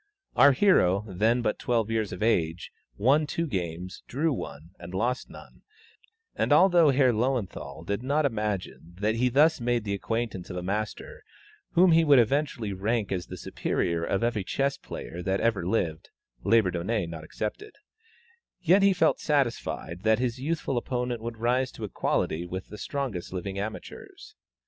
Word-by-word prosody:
Our 140 0 +7
hero, 110 - +3
then 110 +6 +1
but - - -1
twelve 115 -2 0
years 110 -2 -1
of 90 +3 -4
age, 85 -7 0 0.3
won 140 +8 +3
two 165 +3 -1
games, 90 - -4
drew 150 +4 0
one, 80 - -7
and 90 +1 -8
lost 125 +6 -1
none; - - -14 0.7
and - - 0
although 175 -5 +6
Herr 135 -2 +4
Löwenthal 105 - -2
did 100 +4 -2
not 145 +4 +1
imagine 105 -7 -3
that 105 +2 +1
he 125 +2 +2
thus 150 +3 +4
made 120 -1 0
the 100 -2 -2
acquaintance 110 -2 -3
of 90 - -5
a 90 - -4
master 105 +3 -4 0.5
whom 180 +1 +6
he 165 0 +5
would 145 -3 +6
eventually 120 -3 +1
rank 105 +2 -1
as 90 -3 -2
the - - -8
superior 85 -1 -2
of 95 +6 -1
every 115 -4 0
chess 135 +8 0
player 85 - -8
that 95 +2 0
ever 100 -7 0
lived 85 -6 -1 0.3
Labourdonnais 100 -1 +2
not 80 -1 -7
excepted 110 - -5 0.8
yet 185 +3 +4
he 195 0 +5
felt 180 - +2
satisfied 120 - -1
that 110 +1 +3
his 125 0 -2
youthful 145 -2 -2
opponent 125 -1 -3
would 115 0 -5
rise 125 +3 +1
to 115 - -9
equality 85 -4 -1
with 95 +2 -6
the 105 - -9
strongest 120 -10 -4
living 95 +1 -4
amateurs. 110 +2 -8
110 Hz, 165 wpm, -27 LUFS, 95-130 Hz, 0.8 s, Our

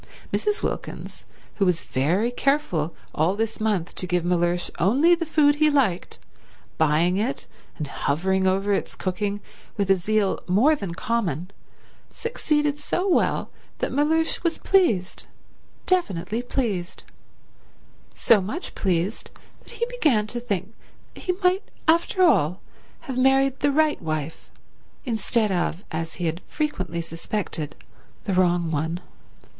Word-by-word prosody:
Mrs. 420 0 0
Wilkins, - - -5 0.3
who 200 - +3
was 175 -2 +1
very 180 - +1
careful 245 - 0 0.2
all 165 +5 +2
this 225 +1 -2
month 205 -6 0
to 185 - -3
give 180 -1 0
Mellersh 175 0 +1
only 265 - +4
the 335 -1 0
food 295 -2 +4
he 305 0 +4
liked, 250 -12 +1 0.6
buying 160 +4 +3
it 230 +7 -2 0.3
and 150 - -3
hovering 190 +7 0
over 195 +2 +2
its - - -2
cooking 200 +2 -2 0.4
with 200 -2 +2
a - - +7
zeal 205 +2 +1
more 230 - +4
than 190 - -5
common, 185 - -2 0.6
succeeded 295 -10 -1
so 360 +5 -1
well 370 - +1 0.3
the - - -2
Mellersh 315 +3 +1
was 335 -2 0
pleased; 230 - +1 0.6
definitely 225 - 0
pleased; 220 -8 -2 1.2
so 220 -4 +6
much 215 - -5
pleased 185 +2 -1 0.3
that - - -15
he 470 - -1
began 310 - +1
to 240 +3 -5
think 205 -3 -3 0.4
that - - -12
he 365 - +2
might, 365 +2 +4 0.3
after 340 +3 +3
all, 185 - +3 0.4
have 260 -2 -4
married 270 +1 +3
the 285 - +2
right 310 +1 +2
wife 155 -1 -4 0.6
instead 220 -2 0
of, 175 0 -1
as 165 0 -4
he 175 - -3
had 165 +2 -2
frequently 185 - -2
suspected, 165 -1 -4 0.5
the 200 - -1
wrong 175 -2 +2
one. 160 +3 -1
205 Hz, 135 wpm, -24 LUFS, 175-285 Hz, 1.2 s, a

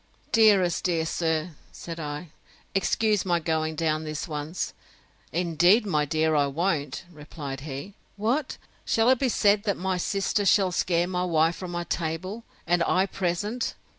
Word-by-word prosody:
Dearest, 200 -6 +4
dear 165 -3 +1
sir, 160 0 -1 0.2
said 165 -1 -8
I, 150 +2 -5 0.4
excuse 210 +1 +2
my 175 -2 +1
going 160 -1 -1
down 155 -1 0
this 155 +1 -4
once! 155 +2 -4 0.6
Indeed, 175 +6 +3
my 150 -7 +1
dear, 160 +2 +1
I 145 -2 +3
won't, 150 -1 -1
replied 150 -3 -7
he. 140 +6 -7 0.2
What! 250 +7 -1 0.3
shall 225 +2 +3
it 260 - +3
be 265 - +1
said, 205 -2 +3
that 200 - 0
my 185 0 -1
sister 195 +3 0
shall 195 -1 +4
scare 175 -1 +1
my 180 -1 -1
wife 165 -1 +2
from 185 0 -6
my 175 0 -3
table, 175 +7 -3 0.2
and 175 +1 +2
I 185 +3 +3
present? 195 +6 -2
175 Hz, 155 wpm, -26 LUFS, 155-195 Hz, 0.6 s, Dearest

